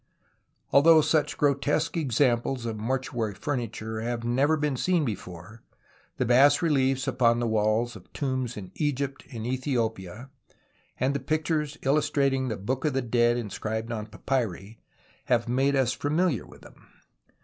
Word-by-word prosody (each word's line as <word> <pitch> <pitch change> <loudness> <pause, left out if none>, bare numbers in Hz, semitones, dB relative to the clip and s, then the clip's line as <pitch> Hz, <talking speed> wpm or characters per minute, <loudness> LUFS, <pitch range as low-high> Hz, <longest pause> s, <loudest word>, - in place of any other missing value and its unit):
Although 160 +3 +7
such 150 -1 +1
grotesque 145 +3 +1
examples 130 -4 +1
of 115 -1 -3
mortuary 120 -3 -2
furniture 110 -5 -4
have 120 0 -3
never 135 +7 +2
been 150 -2 -1
seen 170 +3 +1
before, 100 -1 -7 0.6
the - - 0
bas 135 +5 +5
reliefs 135 -3 +1
upon 120 -3 +3
the 120 - -1
walls 110 +2 +1
of 95 -4 -14
tombs 130 -4 -2
in 95 -3 -8
Egypt 140 -2 -2
and 115 -2 -6
Ethiopia, 120 -3 -3 0.7
and 130 +2 +1
the 140 - -1
pictures 150 +1 -1
illus 140 +2 +2
trating 135 -2 +1
the 110 - -3
Book 125 +7 -3
of 150 -3 +1
the 135 -1 0
Dead 120 0 +2
inscribed 110 +1 -4
on 110 -2 -4
papyri, 110 -2 -3 0.5
have 120 -2 +1
made 135 +3 +2
us 130 -2 +2
familiar 155 - 0
with - - -16
them. - - -17
130 Hz, 150 wpm, -27 LUFS, 115-140 Hz, 0.7 s, Although